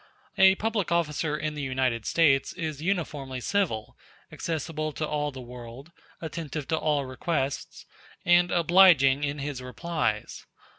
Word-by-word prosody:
A 190 Hz, 0 st, +6 dB
public 215 Hz, -3 st, -1 dB
officer 155 Hz, -2 st, 0 dB
in 150 Hz, 0 st, -3 dB
the 150 Hz, -, -5 dB
United 130 Hz, -4 st, -1 dB
States 145 Hz, -5 st, +3 dB
is 155 Hz, -5 st, -5 dB
uniformly 150 Hz, -8 st, -2 dB
civil, 125 Hz, -, -1 dB, 0.4 s
accessible 155 Hz, -1 st, -3 dB
to 155 Hz, -, -3 dB
all 150 Hz, -1 st, -1 dB
the 130 Hz, -, -9 dB
world, 125 Hz, +4 st, -10 dB, 0.3 s
attentive 155 Hz, -3 st, -5 dB
to 160 Hz, -, +2 dB
all 150 Hz, -3 st, 0 dB
requests, 135 Hz, +1 st, -3 dB, 0.4 s
and 175 Hz, 0 st, +5 dB
obliging 170 Hz, -6 st, +5 dB
in 145 Hz, 0 st, -1 dB
his 140 Hz, -2 st, -4 dB
replies. 125 Hz, -3 st, -3 dB
150 Hz, 135 wpm, -27 LUFS, 135-170 Hz, 0.4 s, A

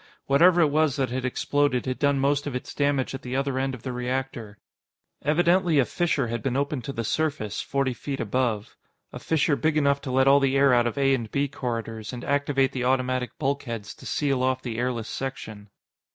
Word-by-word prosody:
Whatever 170 Hz, +6 st, +5 dB
it 150 Hz, -3 st, +3 dB
was 155 Hz, -2 st, +2 dB
that 135 Hz, -4 st, -1 dB
had 130 Hz, 0 st, -2 dB
exploded 140 Hz, 0 st, 0 dB
had 130 Hz, -1 st, -3 dB
done 140 Hz, -1 st, +2 dB
most 140 Hz, +2 st, +1 dB
of 140 Hz, -, -4 dB
its 125 Hz, -, -5 dB
damage 140 Hz, -2 st, 0 dB
at 135 Hz, -, -5 dB
the 125 Hz, 0 st, -5 dB
other 135 Hz, -1 st, 0 dB
end 135 Hz, 0 st, -1 dB
of 120 Hz, -, -14 dB
the 130 Hz, -, -3 dB
reactor. 125 Hz, -3 st, -4 dB, 0.6 s
Evidently, 170 Hz, +2 st, +3 dB
a 135 Hz, -, +4 dB
fissure 165 Hz, -5 st, 0 dB
had 120 Hz, 0 st, -3 dB
been 135 Hz, -1 st, -1 dB
opened 140 Hz, -2 st, -1 dB
to -, -, -3 dB
the 115 Hz, -4 st, -4 dB
surface, 130 Hz, -5 st, -1 dB
forty 135 Hz, -2 st, -1 dB
feet 135 Hz, +3 st, -5 dB
above 115 Hz, -2 st, -1 dB, 0.4 s
a -, -, -6 dB
fissure 160 Hz, -2 st, +1 dB
big 155 Hz, +1 st, 0 dB
enough 140 Hz, -1 st, +2 dB
to -, -, -6 dB
let 130 Hz, +1 st, +3 dB
all 140 Hz, +1 st, +7 dB
the 135 Hz, 0 st, +2 dB
air 135 Hz, -1 st, +5 dB
out 120 Hz, -1 st, +4 dB
of 120 Hz, -, -4 dB
A 135 Hz, -1 st, +3 dB
and 115 Hz, -4 st, -2 dB
B 140 Hz, +4 st, 0 dB
corridors, 115 Hz, -4 st, -5 dB
and 125 Hz, 0 st, -6 dB
activate 140 Hz, -1 st, +1 dB
the 125 Hz, -, -3 dB
automatic 130 Hz, -1 st, 0 dB
bulkheads 135 Hz, -7 st, -3 dB
to -, -, -12 dB
seal 140 Hz, -3 st, 0 dB
off 130 Hz, 0 st, 0 dB
the 115 Hz, -2 st, -4 dB
airless 120 Hz, -2 st, -2 dB
section. 110 Hz, -6 st, -6 dB
135 Hz, 210 wpm, -25 LUFS, 125-140 Hz, 0.6 s, all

